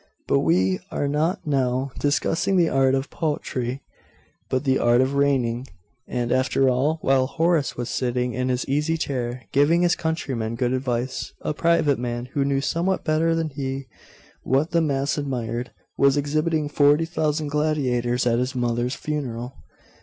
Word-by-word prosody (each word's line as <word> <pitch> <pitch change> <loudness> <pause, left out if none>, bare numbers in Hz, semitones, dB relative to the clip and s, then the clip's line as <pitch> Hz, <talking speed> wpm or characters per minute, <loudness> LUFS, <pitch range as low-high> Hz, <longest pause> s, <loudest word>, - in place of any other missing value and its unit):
But 70 - +3
we 90 +4 +2
are 145 - -1
not 155 +7 0
now 135 -2 0
discussing 160 +6 +1
the 170 -2 +4
art 135 0 +3
of 135 +1 -3
poetry, 135 -5 -3 0.7
but 130 +1 0
the 135 -2 +2
art 120 0 +4
of 130 +2 +2
reigning; 135 -3 +1 0.4
and, 120 -1 -2
after 130 +1 +2
all, 140 +6 +1
while 130 -1 +3
Horace 165 0 +1
was 120 -1 -3
sitting 125 -1 -1
in 125 0 -1
his 125 0 -1
easy 150 +4 0
chair, 125 -4 -3
giving 160 +5 +3
his 175 0 +3
countrymen 130 -9 -2
good 125 +1 0
advice, 130 -1 -2
a - - -2
private 150 -4 +2
man, 120 0 -3
who 140 - +1
knew 135 0 +1
somewhat 175 +6 0
better 160 +1 +2
than 165 -2 -1
he 135 -1 -4 0.6
what 135 +6 +1
the 170 - +3
mass 140 -1 0
admired, 125 -3 -3 0.3
was 140 +1 +4
exhibiting 155 +2 0
forty 145 +2 +3
thousand 155 -2 -1
gladiators 130 -5 0
at 120 -1 +2
his 125 +1 -2
mother's 120 +1 -1
funeral. 130 -5 -4
135 Hz, 160 wpm, -23 LUFS, 125-150 Hz, 0.7 s, the